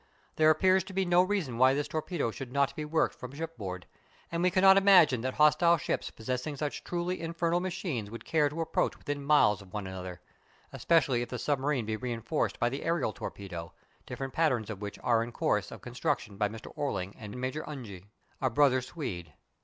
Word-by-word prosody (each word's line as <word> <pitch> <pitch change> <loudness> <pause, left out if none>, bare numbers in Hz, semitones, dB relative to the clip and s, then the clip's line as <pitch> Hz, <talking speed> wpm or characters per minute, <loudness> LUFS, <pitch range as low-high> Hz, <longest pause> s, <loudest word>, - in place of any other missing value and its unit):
There 155 0 +5
appears 185 +4 +4
to 195 - -9
be 190 0 +1
no 175 0 +5
reason 180 - -1
why 130 +1 +6
this 145 0 -1
torpedo 155 -5 -2
should 125 +2 -8
not 140 0 +1
be 155 - -4
worked 160 +2 +1
from 125 +1 -9
shipboard; 105 - -6 0.5
and 170 0 -1
we 180 - +4
cannot 190 +1 +6
imagine 185 - +6
that 130 +1 -3
hostile 155 +3 +5
ships - - -2
possessing 125 +6 -4
such 150 0 -3
truly 175 0 -2
infernal 170 +1 0
machines 175 - -3
would 115 +2 -9
care 150 -3 +2
to 160 +3 -4
approach 165 - 0
within 145 -1 -4
miles 110 -9 +4
of 95 -2 -16
one 105 -2 -3
another, 95 -2 -7 0.5
especially 140 -7 +2
if 120 - -4
the 125 - -4
submarine 140 -2 0
be 110 0 -2
reinforced 120 +4 -2
by 120 - +2
the 135 +3 -4
aërial 165 -10 0
torpedo, 90 -6 -7 0.3
different 135 -1 -5
patterns 130 -10 +1
of 100 -2 -8
which 105 -1 -5
are 115 -2 +3
in 120 - -7
course - - 0
of - - -10
construction 125 -3 -2
by 105 +1 0
Mr. 110 +1 -10
Orling 100 -9 -2
and 105 -1 -8
Major 130 +4 -3
Unge, 105 -11 -8 0.4
a 130 - +2
brother 130 +1 +4
Swede. 100 - -6
135 Hz, 195 wpm, -30 LUFS, 115-165 Hz, 0.5 s, why